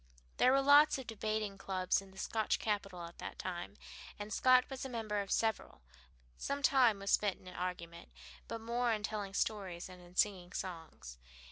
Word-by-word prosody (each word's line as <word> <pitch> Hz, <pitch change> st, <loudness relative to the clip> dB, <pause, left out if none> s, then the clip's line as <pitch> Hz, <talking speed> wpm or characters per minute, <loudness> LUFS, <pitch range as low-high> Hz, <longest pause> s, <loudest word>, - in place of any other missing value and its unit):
There 255 Hz, -, +5 dB
were 275 Hz, +1 st, +4 dB
lots 290 Hz, +2 st, +7 dB
of 265 Hz, -, -7 dB
debating 215 Hz, -2 st, -3 dB
clubs 185 Hz, -1 st, 0 dB
in 195 Hz, -, -14 dB
the 190 Hz, -, -17 dB
Scotch 220 Hz, +3 st, 0 dB
capital 195 Hz, -4 st, -2 dB
at 170 Hz, 0 st, -10 dB
that -, -, -6 dB
time, 185 Hz, +2 st, -5 dB, 0.4 s
and 205 Hz, 0 st, -6 dB
Scott 255 Hz, +2 st, +5 dB
was 270 Hz, -1 st, -6 dB
a 265 Hz, -, -4 dB
member 215 Hz, -4 st, -2 dB
of 200 Hz, -, -7 dB
several. 220 Hz, -, -1 dB, 0.6 s
Some 280 Hz, 0 st, -3 dB
time 255 Hz, -7 st, +5 dB
was 200 Hz, 0 st, -3 dB
spent 205 Hz, -3 st, +2 dB
in 185 Hz, -, -16 dB
argument, 175 Hz, -2 st, -5 dB, 0.4 s
but 230 Hz, -1 st, -5 dB
more 235 Hz, +1 st, 0 dB
in 210 Hz, -1 st, -3 dB
telling 205 Hz, -2 st, -3 dB
stories 190 Hz, -6 st, -2 dB
and 180 Hz, -1 st, -12 dB
in 175 Hz, 0 st, -16 dB
singing 185 Hz, -2 st, +1 dB
songs. 160 Hz, -, -7 dB
205 Hz, 180 wpm, -35 LUFS, 185-230 Hz, 0.6 s, lots